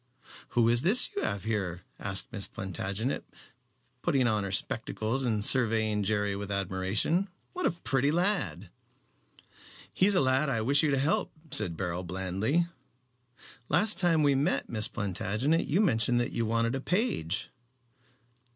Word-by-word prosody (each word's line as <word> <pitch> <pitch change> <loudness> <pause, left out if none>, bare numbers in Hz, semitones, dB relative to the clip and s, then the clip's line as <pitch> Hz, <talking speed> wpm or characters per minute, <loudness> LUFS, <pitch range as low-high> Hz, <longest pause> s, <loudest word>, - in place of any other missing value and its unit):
"Who 115 -1 +5
is 120 +1 +5
this 210 - +5
you 405 - -1
have 100 - -2
here?" 95 -5 -3 0.2
asked 100 +6 -1
Miss 100 -4 -4
Plantagenet, 95 - -4 0.8
putting 135 -2 +1
on 110 -3 +1
her 100 - -4
spectacles 115 +3 -1
and 110 -4 +1
surveying 110 -4 +3
Jerry 105 0 0
with 100 0 -5
admiration. 100 - 0 0.3
"What 365 -1 0
a - - +1
pretty 140 -4 0
lad!" 180 +6 -1 1.2
"He 190 - +3
is 205 - +3
a - - +4
lad 135 +2 +2
I 115 -4 0
wish 140 +6 +5
you 155 - +1
to 140 - +1
help," 140 +4 0 0.2
said 90 -6 -1
Beryl, 90 -1 -3
blandly. 95 - -1 1.0
"Last 200 +9 +2
time 165 -4 +3
we 145 -1 +4
met, 140 +7 +1
Miss 110 -2 0
Plantagenet, 105 - -1
you 175 +8 +2
mentioned 120 - +2
that 120 - -1
you 115 -1 -2
wanted 115 +1 0
a 135 - -3
page." 135 - -1
115 Hz, 150 wpm, -29 LUFS, 100-145 Hz, 1.2 s, Who